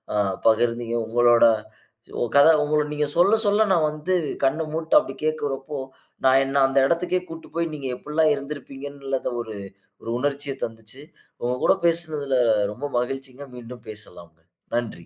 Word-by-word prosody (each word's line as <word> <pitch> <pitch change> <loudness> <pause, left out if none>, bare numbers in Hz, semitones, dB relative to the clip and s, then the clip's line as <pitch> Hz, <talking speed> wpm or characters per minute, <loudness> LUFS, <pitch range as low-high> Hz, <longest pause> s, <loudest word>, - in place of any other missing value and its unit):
அ - - +1 0.3
பகிர்ந்தீங்க. 115 +1 +2
உங்களோட 120 +1 +4 0.9
கத 140 +2 +8 0.2
உங்க 150 +1 0 0.2
நீங்க 150 0 0
சொல்ல, 190 +5 +5
சொல்ல 205 +2 +4
நான் 160 -4 +3
வந்து 155 +5 -3 0.3
கண்ண 145 +4 +2
மூட்டு 160 0 0
அப்டி - - -6
கேட்குறபோ, 145 -2 -2 0.5
நான் 130 +1 +6
என்ன 135 +1 +1
அந்த 135 - -2
இடத்துக்கே 180 +3 0
கூட்டு 165 0 -9
போய் 170 -1 -1
நீங்க 140 -3 -5
எப்டில்லா 150 +4 0
இருந்துருப்பீங்கனு 140 -2 -5
ஒரு 110 -2 -7 0.5
ஒரு 115 - -7
உணர்ச்சிய 140 +1 -2
தந்துச்சி. 115 +3 -7 0.4
உங்க 120 +1 0
கூட - - +5
பேசுனதுல, 155 -5 +1 0.4
ரொம்ப 140 +5 -6
மகிழ்ச்சிங்க. 135 +2 -5
மீண்டும் 120 -1 -10
பேசலாம். 90 -6 -9 0.4
நன்றி 115 -8 -3
140 Hz, 140 wpm, -24 LUFS, 120-155 Hz, 0.9 s, கத